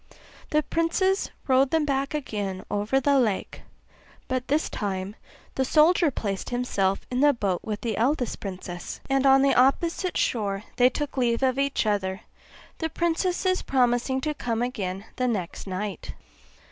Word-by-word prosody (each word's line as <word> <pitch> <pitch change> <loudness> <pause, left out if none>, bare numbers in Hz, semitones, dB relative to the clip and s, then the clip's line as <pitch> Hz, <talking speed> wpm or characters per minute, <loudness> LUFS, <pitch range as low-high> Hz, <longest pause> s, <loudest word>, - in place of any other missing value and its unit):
The 305 0 +2
princes 375 +5 +1 0.2
rowed 265 0 +4
them 320 0 +2
back 275 +1 -1
again 205 -9 -4
over 210 +6 +1
the 280 +1 +3
lake 215 -6 -1 0.7
(but 255 -1 -2
this 300 +3 +1
time 195 -1 -4 0.4
the 265 - 0
soldier 315 +4 +4
placed 200 -7 -4
himself 200 -6 0
in 250 - 0
the 290 +1 +5
boat 195 -7 -1
with 210 -2 -4
the 225 -3 -2
eldest 250 +1 0
princess); 185 -3 -6
and 270 0 +3
on 270 0 +6
the 275 - +4
opposite 335 +8 +2
shore 200 -3 0
they 250 0 +6
took 290 +2 -4
leave 240 0 +1
of 260 0 +2
each 280 -4 +1
other, 195 -2 -1 0.6
the 320 - -1
princesses 355 +3 0
promising 255 0 +1
to 305 +2 -1
come 235 -4 -2
again 200 -6 -3
the 255 - +1
next 195 -5 -3
night. 190 -1 -5
250 Hz, 155 wpm, -26 LUFS, 205-285 Hz, 0.7 s, on